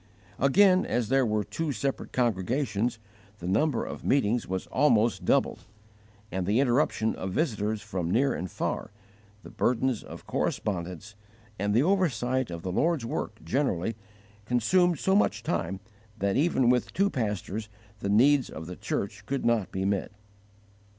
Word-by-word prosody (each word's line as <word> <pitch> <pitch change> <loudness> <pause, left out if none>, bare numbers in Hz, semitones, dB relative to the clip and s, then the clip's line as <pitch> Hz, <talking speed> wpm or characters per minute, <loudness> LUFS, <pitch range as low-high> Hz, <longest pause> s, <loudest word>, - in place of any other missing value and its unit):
Again, 185 +7 +5
as 120 -3 -1
there 135 -2 +3
were 105 -1 0
two 165 +5 -3
separate 135 +2 -3
congregations, 120 +1 0 0.4
the 85 - -9
number 115 +6 +1
of - - -7
meetings 120 -3 +1
was 95 0 -3
almost 120 -5 +2
doubled; - - +1 0.7
and 95 -1 -2
the 105 +5 +3
interruptions 125 -4 +2
of 95 0 -4
visitors 110 - -1
from 90 -3 -3
near 130 +9 +2
and 90 +2 -4
far, - - -3 0.5
the - - -11
burdens 125 -1 +1
of - - -11
correspondence, 90 +1 -3 0.5
and 100 +1 0
the 120 - +5
oversight 130 -9 +1
of 85 -1 -6
the 95 - -3
Lord's 155 - +1
work 110 -2 -4
generally, 115 - 0 0.5
consumed 170 - +3
so 190 +7 +1
much 110 - +2
time 85 -1 -2 0.4
that 100 -1 0
even 135 -5 +3
with 125 -1 0
two 200 +1 +2
pastors 105 -2 -3 0.3
the 100 - -3
needs 130 +6 +4
of 80 - -7
the 90 +2 -7
church 100 -1 -3
could 140 0 -2
not 115 -5 +1
be 95 0 -2
met. 100 -1 -1
115 Hz, 150 wpm, -28 LUFS, 100-135 Hz, 0.7 s, Again